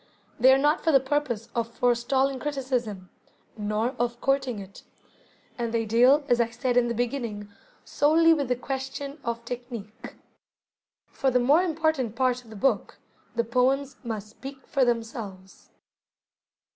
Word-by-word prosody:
They 260 Hz, +3 st, +7 dB
are 265 Hz, -, +6 dB
not 295 Hz, +3 st, +2 dB
for 325 Hz, -, +3 dB
the 270 Hz, -, +6 dB
purpose 265 Hz, -5 st, -2 dB
of 230 Hz, -1 st, -1 dB
forestalling 250 Hz, +3 st, +1 dB
criticism, 250 Hz, -10 st, -3 dB, 0.4 s
nor 215 Hz, +2 st, -1 dB
of 240 Hz, 0 st, -1 dB
courting 270 Hz, -3 st, 0 dB
it; 195 Hz, 0 st, -10 dB, 0.8 s
and 235 Hz, -1 st, -1 dB
they 225 Hz, -1 st, 0 dB
deal, 250 Hz, +7 st, +5 dB
as 240 Hz, -3 st, +3 dB
I 230 Hz, -, +1 dB
said 245 Hz, +2 st, -2 dB
in 245 Hz, -1 st, +4 dB
the 235 Hz, -, -2 dB
beginning, 235 Hz, -4 st, -3 dB, 0.4 s
solely 325 Hz, +3 st, +4 dB
with 285 Hz, -4 st, -1 dB
the 250 Hz, -, +1 dB
question 270 Hz, +3 st, -5 dB
of 235 Hz, 0 st, -4 dB
technique. 235 Hz, -3 st, -7 dB, 1.0 s
For 270 Hz, -, 0 dB
the 250 Hz, -, +2 dB
more 280 Hz, +7 st, +4 dB
important 315 Hz, -, 0 dB
part 255 Hz, -1 st, +1 dB
of 230 Hz, -, -18 dB
the 220 Hz, -, -10 dB
book, 265 Hz, +7 st, 0 dB, 0.4 s
the 235 Hz, -, +2 dB
poems 260 Hz, +3 st, +1 dB
must 220 Hz, -3 st, -4 dB
speak 270 Hz, +5 st, -11 dB
for 275 Hz, -, +1 dB
themselves. 225 Hz, -5 st, -4 dB
245 Hz, 150 wpm, -26 LUFS, 230-270 Hz, 1.0 s, They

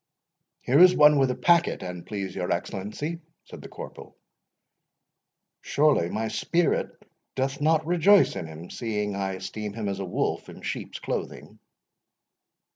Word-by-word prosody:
"Here 135 Hz, +4 st, +3 dB
is 180 Hz, 0 st, +8 dB
one 150 Hz, -1 st, +6 dB
with 135 Hz, -1 st, +3 dB
a 125 Hz, -, -1 dB
packet, 170 Hz, -, +2 dB
an 90 Hz, -1 st, -7 dB
please 100 Hz, -3 st, -5 dB
your 90 Hz, -2 st, -3 dB
Excellency," 105 Hz, -, -4 dB, 0.2 s
said -, -, -11 dB
the -, -, -10 dB
corporal—"Surely 145 Hz, -, -5 dB
my 110 Hz, +3 st, -2 dB
spirit 170 Hz, +7 st, 0 dB, 0.5 s
doth 135 Hz, +2 st, -2 dB
not 155 Hz, +1 st, +2 dB
rejoice 180 Hz, +4 st, +4 dB
in 80 Hz, -, -5 dB
him, 80 Hz, +2 st, -10 dB
seeing 105 Hz, -3 st, -3 dB
I 95 Hz, -1 st, -2 dB
esteem 105 Hz, +2 st, -6 dB
him 110 Hz, -1 st, -4 dB
as 100 Hz, -1 st, -3 dB
a 95 Hz, -, -3 dB
wolf 90 Hz, -, -2 dB
in -, -, -12 dB
sheep's -, -, -5 dB
clothing." -, -, -6 dB
115 Hz, 140 wpm, -26 LUFS, 95-155 Hz, 0.5 s, is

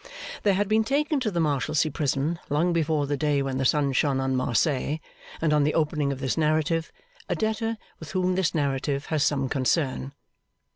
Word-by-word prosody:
There 200 Hz, -2 st, +3 dB
had 205 Hz, +1 st, +1 dB
been 220 Hz, +1 st, +3 dB
taken 285 Hz, +4 st, +1 dB
to 245 Hz, -4 st, 0 dB
the 175 Hz, -4 st, -2 dB
Marshalsea 155 Hz, 0 st, +1 dB
Prison, 145 Hz, +3 st, -1 dB
long 165 Hz, +5 st, +2 dB
before 155 Hz, -3 st, +1 dB
the 145 Hz, +1 st, -1 dB
day 145 Hz, 0 st, +1 dB
when 135 Hz, -1 st, -2 dB
the 135 Hz, -, 0 dB
sun 140 Hz, +1 st, +2 dB
shone 135 Hz, 0 st, +2 dB
on 135 Hz, 0 st, 0 dB
Marseilles 130 Hz, +4 st, +1 dB, 0.4 s
and 155 Hz, -2 st, +1 dB
on 150 Hz, -1 st, +4 dB
the 150 Hz, -, +1 dB
opening 150 Hz, -3 st, +1 dB
of 135 Hz, -, -4 dB
this 135 Hz, +2 st, -1 dB
narrative, 155 Hz, +1 st, +1 dB, 0.4 s
a -, -, +1 dB
debtor 220 Hz, +1 st, -1 dB, 0.2 s
with 160 Hz, -, -9 dB
whom 185 Hz, -1 st, +1 dB
this 180 Hz, -2 st, 0 dB
narrative 140 Hz, -1 st, -1 dB
has 150 Hz, -3 st, +2 dB
some 135 Hz, -2 st, +1 dB
concern. 135 Hz, 0 st, 0 dB
150 Hz, 190 wpm, -26 LUFS, 140-170 Hz, 0.4 s, on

